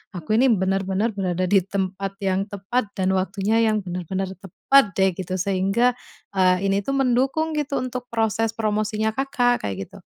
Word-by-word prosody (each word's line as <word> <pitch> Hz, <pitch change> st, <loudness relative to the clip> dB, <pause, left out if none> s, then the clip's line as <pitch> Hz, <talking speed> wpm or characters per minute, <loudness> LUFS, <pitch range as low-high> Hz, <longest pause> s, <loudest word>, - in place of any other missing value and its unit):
aku 175 Hz, +3 st, -5 dB
ini 265 Hz, -, +5 dB
benar-benar 195 Hz, +1 st, +1 dB
berada 185 Hz, -3 st, -2 dB
di 200 Hz, -, +5 dB
tempat 195 Hz, 0 st, -3 dB
yang 195 Hz, +1 st, 0 dB
tepat, 205 Hz, +4 st, -2 dB
dan 190 Hz, -1 st, +1 dB
waktunya 195 Hz, +4 st, 0 dB
yang 215 Hz, -3 st, +2 dB
benar-benar 185 Hz, +1 st, -4 dB
tepat 200 Hz, +4 st, +2 dB
deh 190 Hz, -1 st, +3 dB
gitu, 185 Hz, 0 st, -3 dB
sehingga, 195 Hz, +6 st, +2 dB, 0.4 s
eee, 185 Hz, -1 st, +2 dB
ini 200 Hz, -, +2 dB
tuh 275 Hz, +7 st, -2 dB
mendukung 270 Hz, +5 st, +1 dB
gitu 285 Hz, -1 st, -2 dB
untuk 250 Hz, -1 st, -5 dB
proses 225 Hz, -1 st, 0 dB
promosinya 215 Hz, 0 st, 0 dB
Kakak 245 Hz, -, 0 dB
kayak 95 Hz, 0 st, -4 dB
gitu. -, -, -14 dB
200 Hz, 160 wpm, -23 LUFS, 190-230 Hz, 0.4 s, ini